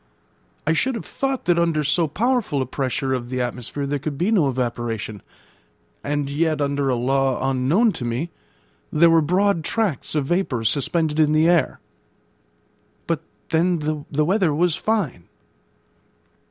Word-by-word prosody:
I 160 - +3
should 260 +9 +1
have 230 - -6
thought 270 -1 -2
that 175 -1 +3
under 165 -3 +1
so 155 +3 +2
powerful 225 - 0
a 130 - 0
pressure 130 +1 -2
of 120 -2 -3
the 130 0 -2
atmosphere 125 +3 -3
there 145 +1 -2
could 145 0 -4
be 180 +8 +1
no 170 -11 +3
evaporation; 120 -4 -3 0.8
and 145 -1 -1
yet, 155 +2 0
under 140 -1 0
a 130 - +2
law 135 +1 +1
unknown 155 - +3
to 130 - -6
me, 120 +8 -2 0.6
there 165 +2 +5
were 165 0 +5
broad 180 +2 +1
tracts 195 - -1
of 145 -3 +1
vapour 145 -8 0
suspended 150 +6 +1
in 155 -1 +4
the 155 +1 +4
air. 170 -6 +2 1.3
But - - -1 0.3
then 170 +2 +2 0.3
'the 150 +1 +1
weather 180 -4 +2
was 170 0 +2
fine.' 185 - -1
150 Hz, 155 wpm, -22 LUFS, 130-175 Hz, 1.3 s, there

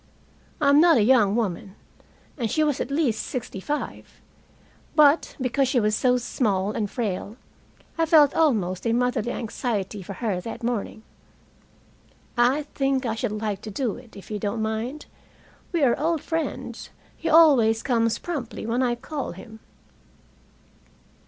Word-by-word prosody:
I 290 -3 +3
am 285 +2 +6
not 335 -4 +6
a 215 - +4
young 215 -4 +4
woman, 195 -3 -2 0.6
and 235 -6 -2
she 310 - +1
was 295 -3 0
at - - -3
least 275 -6 0
sixty 245 -6 -5
five. 290 +10 -5 0.8
But, 300 0 +4
because 260 +1 +1
she 250 0 +2
was 215 -1 +1
so 250 +1 +2
small 210 -5 -1
and 210 -1 -2
frail, 210 -1 -4 0.6
I 325 - +2
felt 300 -3 +6
almost 215 - +1
a 230 - +2
motherly 245 -1 0
anxiety 210 -4 -3
for 195 +2 -7
her 195 -3 -2
that 230 +4 -7
morning. 230 -2 -3 1.3
"I 250 +5 +3
think 270 -1 0
I 225 - 0
should 225 0 -2
like 210 -2 -3
to 220 - -7
do 225 +1 -2
it, 230 -4 -14
if 200 - -12
you 210 - -3
don't 215 +2 -2
mind. 225 +7 -3 0.7
We 340 -4 +1
are 245 -3 +5
old 320 0 0
friends. 325 -1 -4 0.3
He 330 - -3
always 275 -9 +5
comes 230 -3 +1
promptly 285 -11 -5
when 235 +3 0
I 245 -2 +1
call 275 - -5
him." 220 +5 -12
240 Hz, 155 wpm, -24 LUFS, 215-280 Hz, 1.3 s, am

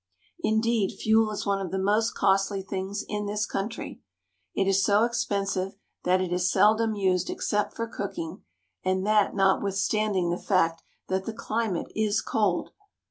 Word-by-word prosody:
Indeed, 220 -1 +1
fuel 220 0 +3
is 210 - -4
one 200 -1 0
of 185 - -4
the 190 - -2
most 210 +4 +1
costly 195 0 +2
things 195 +1 -4
in 210 0 -3
this 210 +1 -1
country. 215 +4 -5 0.5
It 195 - +1
is 195 0 +3
so 205 +2 +4
expensive 200 -5 -1 0.3
that 185 +1 +3
it 180 -1 -1
is 180 0 +1
seldom 220 +1 +3
used 185 -3 +1
except 205 0 -1
for 230 - -2
cooking, 185 -5 -5 0.4
and 185 +1 0
that 210 -1 +3
notwithstanding 195 -1 +1
the 175 - -2
fact 165 -4 +1 0.3
that 190 0 -1
the 225 - -4
climate 220 -4 -2
is 215 -1 +1
cold. 205 -5 0
200 Hz, 155 wpm, -27 LUFS, 190-215 Hz, 0.5 s, so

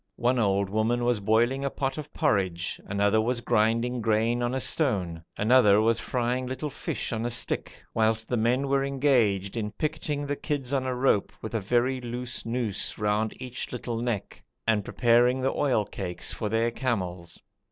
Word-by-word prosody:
One 125 +1 +1
old 100 -2 +2
woman 110 +4 0
was 120 -3 +2
boiling 115 +6 +2
a 140 - 0
pot 135 +1 -3
of 150 -1 -8
porridge, 95 -3 0
another 100 +2 +2
was 120 +2 0
grinding 120 +2 +1
grain 115 +2 +1
on 120 +2 0
a - - 0
stone, 95 - 0
another 105 -2 +5
was 115 +1 +2
frying 125 +1 -1
little 130 +3 -4
fish - - -4
on 110 0 -2
a 120 - -1
stick, 120 -1 -3
whilst 110 0 +1
the 125 - 0
men 120 +4 +1
were 135 0 +2
engaged 125 -9 +1
in 105 -2 -1
picketing 150 -1 -2
the 145 0 -1
kids 140 -3 -3
on 130 -1 0
a 130 - -1
rope 125 -5 +2
with 110 - -5
a 115 - +1
very 125 +5 +1
loose 120 0 -4
noose 115 -4 -1
round 105 +1 0
each 125 -1 -5
little 120 -1 -4
neck, 120 -4 -3 0.2
and 110 -3 +2
preparing 120 +4 +3
the 135 - +1
oil 125 -7 +1
cakes 90 -4 -4
for 105 - -3
their 115 +2 +1
camels. 90 -9 -3
120 Hz, 180 wpm, -27 LUFS, 105-130 Hz, 0.2 s, another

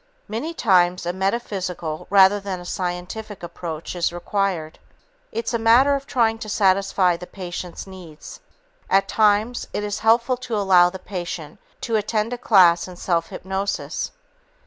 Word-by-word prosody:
Many 300 +10 -4
times, 180 - +3
a 175 - -1
metaphysical 190 -5 -3
rather 195 +1 +6
than 195 -2 -5
a 175 - -10
scientific 180 +3 -5
approach 170 -1 -6
is 175 -1 0
required. 175 -3 -2 0.5
It's 230 +2 -3
a 235 - +1
matter 240 +5 +5
of 275 0 -3
trying 225 -4 +1
to 215 - -7
satisfy 195 -3 +2
the 180 - -10
patient's 180 -2 -7
needs. 180 -5 -11 0.5
At 195 0 +3
times, 215 +3 +2
it 210 - -2
is 205 0 -3
helpful 235 +3 +3
to 245 -2 -4
allow 185 -3 +5
the 190 - -7
patient 175 -5 -6 0.2
to 225 -2 0
attend 215 +2 -1
a 245 - -5
class 180 -8 +5
in 180 - -10
self 170 -2 -1
hypnosis. 190 +1 -3
195 Hz, 150 wpm, -22 LUFS, 175-220 Hz, 0.5 s, rather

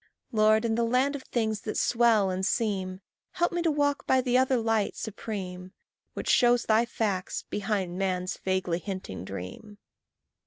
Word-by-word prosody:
Lord, 215 0 +4
in 225 - +1
the 235 +1 +1
land 255 +5 +2
of 280 - -5
things 220 -5 -2
that 215 - -4
swell 230 -5 +3
and 185 +1 -3
seem, 190 -3 -1 0.3
Help 345 -1 +1
me 345 -1 -1
to 335 - +2
walk 290 -1 0
by 260 - +4
the 250 -1 0
other 260 0 +4
light 225 -2 0
supreme, 190 -4 -6 0.4
Which - - -5
shows 240 -1 +4
thy 220 +2 +3
facts 200 -6 -2
behind 195 -3 -2
man's 185 -1 -1
vaguely 185 -2 -1
hinting 185 - -6
dream. 95 - -8
215 Hz, 160 wpm, -28 LUFS, 185-240 Hz, 0.4 s, Lord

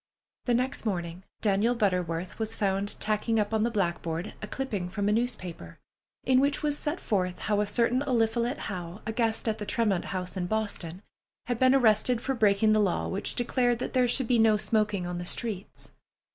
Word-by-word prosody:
The 245 - +2
next 255 +2 -1
morning 180 -3 -3 0.2
Daniel 215 +3 +2
Butterworth 180 -5 -1
was 220 0 -1
found 200 0 -1
tacking 215 +1 +1
up 210 +1 -1
on 220 - +2
the 230 - +2
blackboard 170 -4 -2
a 210 - -5
clipping 210 -8 -3
from 200 +2 -2
a - - +3
newspaper, 200 - -3 0.5
in 255 0 +4
which 280 +2 +1
was 295 -1 +2
set 295 +3 -2
forth 185 -4 -1
how 210 -1 0
a 210 - -1
certain 235 +4 +2
Eliphalet 240 -1 +1
Howe, 180 -2 -6
a 220 - -2
guest 225 0 -1
at 220 0 0
the 210 - -4
Tremont 215 -7 +1
House 185 0 -4
in 180 -2 -2
Boston, 200 -4 -3 0.4
had 245 -1 -2
been 260 +1 +5
arrested 230 -1 +4
for 270 +3 -1
breaking 215 -2 +3
the 215 - +4
law 195 -4 +1
which 195 - -1
declared 245 0 +1
that 245 - -4
there 255 -2 +3
should 245 +1 +1
be 240 -1 +3
no 220 -1 +5
smoking 210 -4 +1
on 175 0 -4
the - - -4
streets. 205 0 -5
215 Hz, 195 wpm, -28 LUFS, 190-240 Hz, 0.5 s, been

